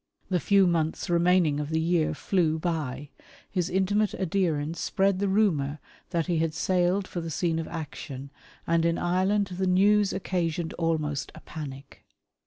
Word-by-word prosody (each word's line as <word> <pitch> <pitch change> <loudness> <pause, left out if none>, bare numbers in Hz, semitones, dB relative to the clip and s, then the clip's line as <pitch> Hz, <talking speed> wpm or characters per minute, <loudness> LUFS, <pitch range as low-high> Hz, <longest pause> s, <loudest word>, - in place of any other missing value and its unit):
The 180 -2 +2
few 200 +2 +4
months 165 -1 0
remaining 170 -3 +3
of 150 0 -3
the 160 0 0
year 160 -1 +1
flew 165 -2 +1
by; 150 -5 -3 0.4
his 180 -2 -1
intimate 195 +3 +1
adherents 165 -4 -1
spread 195 -1 +1
the 200 - +1
rumour 160 -9 +1 0.3
that 165 -2 0
he 170 -3 0
had 160 -1 0
sailed 180 +3 +1
for 175 - -4
the 165 - -5
scene 165 +1 0
of 165 - -4
action, 140 -4 -7 0.3
and 165 0 +2
in 170 0 +2
Ireland 190 +3 +1
the 190 - +1
news 200 +2 +4
occasioned 175 -3 -2
almost 155 -4 -1
a - - -9
panic. 140 -3 -9
170 Hz, 160 wpm, -27 LUFS, 155-185 Hz, 0.4 s, few